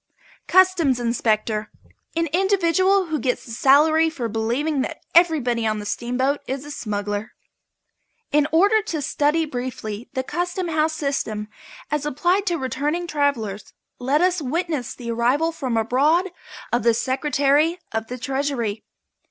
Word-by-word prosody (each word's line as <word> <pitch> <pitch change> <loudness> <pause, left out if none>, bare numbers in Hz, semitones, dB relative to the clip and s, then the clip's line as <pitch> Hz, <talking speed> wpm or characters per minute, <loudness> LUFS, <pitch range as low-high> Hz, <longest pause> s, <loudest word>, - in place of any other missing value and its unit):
CUSTOMS 360 -8 +4
INSPECTOR. 220 -2 0 0.5
An 330 0 +1
individual 380 0 +3
who 315 -3 -2
gets 250 -2 -1
a 235 - -10
salary 305 +7 +4
for 260 -8 -4
believing 240 +7 -1
that - - -4
everybody 275 -10 +3
on 215 0 0
the 210 - -6
steamboat 255 +6 -1
is 270 +2 -4
a 295 - -8
smuggler. 205 -2 -4 1.0
In 295 0 +3
order 405 +7 +4
to 350 -7 -4
study 295 +3 +1
briefly 245 -5 -5
the 260 0 -1
Custom 350 +5 -3
House 315 0 +1
system 250 -8 -3 0.4
as 300 -1 0
applied 355 +8 +1
to 345 -2 +1
returning 290 +6 -2
travellers 245 - -2 0.3
let 275 +5 +1
us 365 -1 +2
witness 305 -2 -2
the 235 -2 -5
arrival 255 +8 +1
from 260 -8 -2
abroad 295 - +2 0.4
of 240 - +3
the 230 +1 +3
Secretary 285 +5 +1
of 220 0 -3
the 250 - -6
Treasury. 260 -5 -2
280 Hz, 140 wpm, -22 LUFS, 235-325 Hz, 1.0 s, CUSTOMS